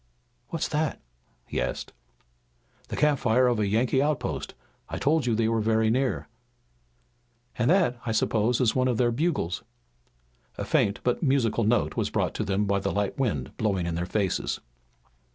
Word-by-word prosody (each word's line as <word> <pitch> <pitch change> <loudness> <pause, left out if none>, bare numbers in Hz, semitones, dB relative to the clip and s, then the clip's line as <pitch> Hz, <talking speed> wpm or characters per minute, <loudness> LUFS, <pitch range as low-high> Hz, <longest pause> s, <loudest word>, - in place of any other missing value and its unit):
"What's 165 - -2
that?" 155 -1 -1 0.5
he - - -2
asked. - - -4 0.9
"The - - -5
campfire 130 -5 +3
of 120 -3 +2
a 105 - +1
Yankee 120 +6 +2
outpost. 150 0 -2 0.3
I - - -4
told 150 -2 +1
you 115 - +2
they 110 0 +2
were 115 -1 +1
very 110 0 +2
near." 130 +2 0 1.3
"And 120 - +1
that, 165 -10 +3
I 115 - -2
suppose, 110 +1 +1
is 125 -4 +2
one 130 0 +2
of 125 -3 +1
their 120 0 +3
bugles." 135 - -1 1.0
A - - -3
faint 100 0 +1
but 125 - 0
musical 130 -7 +2
note 120 +2 +1
was - - 0
brought - - 0
to - - -2
them 100 +1 0
by 100 0 +1
the - - -2
light 100 +3 -2
wind 85 - -1
blowing 100 -5 0
in 85 - -2
their 85 +1 -2
faces. 95 -1 -1
115 Hz, 170 wpm, -27 LUFS, 105-130 Hz, 1.3 s, campfire